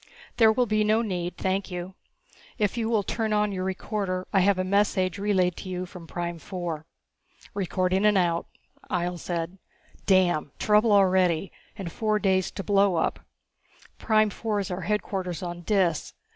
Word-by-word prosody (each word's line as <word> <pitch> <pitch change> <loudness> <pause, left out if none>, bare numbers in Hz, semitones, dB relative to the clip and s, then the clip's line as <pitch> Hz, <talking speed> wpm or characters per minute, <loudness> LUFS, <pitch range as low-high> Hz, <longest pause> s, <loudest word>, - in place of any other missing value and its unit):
"There 225 -2 +6
will 245 +2 +2
be 215 -1 +1
no 215 +2 +3
need, 180 -4 -3
thank 190 +1 -1
you. 180 +1 -5 0.6
If 210 -3 0
you 230 -2 -1
will 220 -3 +2
turn 220 +1 -1
on 210 0 +2
your 185 -1 -3
recorder 190 -1 -3
I 195 - +5
have 195 +1 +3
a 185 - 0
message 195 0 +1
relayed 190 -4 +1
to 185 - -7
you 180 0 -3
from 175 -2 -11
Prime 175 0 -4
four." 170 -4 -5 0.7
"Recording 185 0 0
and 210 -1 +4
out," 170 -2 +1 0.4
Ihjel 175 0 -1
said. 175 +2 -4 0.5
"Damn! 175 -7 +3
Trouble 210 +1 +3
already, 185 -3 +3 0.3
and 185 -5 -5
four 215 +2 0
days 190 -3 +1
to 195 - -6
blowup. 195 -4 +2 0.8
Prime 215 -1 +3
four 215 -1 -2
is 195 -2 -3
our 180 +1 -3
headquarters 190 -2 -2
on 175 0 -5
Dis. 180 -4 0
190 Hz, 160 wpm, -26 LUFS, 180-210 Hz, 0.8 s, There